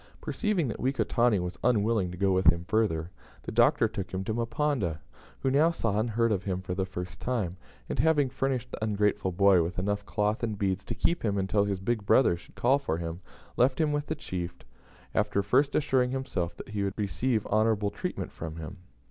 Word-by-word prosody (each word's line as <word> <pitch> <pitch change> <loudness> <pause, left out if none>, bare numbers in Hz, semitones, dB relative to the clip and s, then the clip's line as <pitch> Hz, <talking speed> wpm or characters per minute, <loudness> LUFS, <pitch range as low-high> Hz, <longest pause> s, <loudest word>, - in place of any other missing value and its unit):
Perceiving 210 - -1
that 115 - -4
Wekotani 120 -3 +2
was 90 -1 -4
unwilling 110 -4 +2
to 90 - -8
go 100 +1 +2
with 95 -2 +2
him 85 +1 +4
further, 90 -7 0 0.3
the - - -5
Doctor 120 +1 +4
took 100 -4 -5
him 95 0 -3
to 110 - -2
Mponda, 120 - -1 0.4
who 135 - +1
now 150 +5 +5
saw 115 -11 -1
and 115 +2 0
heard 115 +1 +1
of 95 -3 0
him 95 -2 -1
for 95 -1 -4
the 95 0 -1
first 90 -1 -6
time, 110 -9 -1 0.3
and, - - -4
having 155 -3 +4
furnished 130 -1 -2
the - - -5
ungrateful 105 -3 +1
boy 95 0 +5
with 85 +2 -3
enough 105 +2 -1
cloth 105 +1 0
and 110 -3 -2
beads 95 -1 -1
to 115 - -4
keep 170 +9 0
him 100 -3 0
until 100 +1 +1
his 100 -2 -2
"big 110 +2 -1
brother" 100 -3 +4
should 85 - -15
call 135 +4 +3
for 135 - -2
him, 85 +1 -5 0.4
left 130 +4 +3
him 155 -2 +2
with 145 0 -1
the 155 - -2
chief, 90 - -5 0.6
after 105 -2 +1
first 135 +8 +2
assuring 130 -4 +2
himself 130 -10 -3
that - - -9
he 105 -1 -3
would 100 -1 -3
receive 105 - 0
honourable 110 -1 +2
treatment 100 - -4
from 80 -1 -7
him. 80 +4 -7
105 Hz, 205 wpm, -28 LUFS, 95-125 Hz, 0.6 s, now